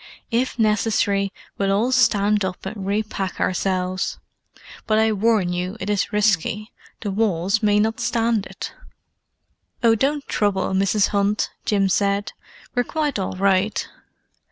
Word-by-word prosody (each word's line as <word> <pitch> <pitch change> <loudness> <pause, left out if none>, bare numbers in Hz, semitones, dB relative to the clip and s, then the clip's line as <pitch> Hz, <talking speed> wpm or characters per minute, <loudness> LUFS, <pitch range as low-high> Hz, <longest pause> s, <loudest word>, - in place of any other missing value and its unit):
If 245 +3 0
necessary 210 -2 +1 0.3
we'll 195 0 +1
all 220 +6 +2
stand 210 -5 +3
up 185 -1 -4
and 195 -1 -5
re 205 +2 +1
pack 195 -3 -5
ourselves, 185 0 -1 0.7
but 215 - +3
I 220 0 +3
warn 210 -3 +2
you 180 +4 -3
it 195 +2 -2
is 200 0 0
risky: 210 0 +1 0.3
the 205 - -2
walls 200 -1 +1
may 205 -1 +3
not 220 +2 +1
stand 230 -3 0
it!" - - -7 1.1
"Oh, 230 -1 +6
don't 275 +5 0
trouble, 195 -2 0
Mrs. 195 +2 +2
Hunt," 205 +1 0
Jim 200 -3 +2
said. 200 +1 +1 0.4
"We're 245 - +2
quite 295 -3 -2
all 190 - -2
right." 195 +2 +1
205 Hz, 140 wpm, -22 LUFS, 195-220 Hz, 1.1 s, Oh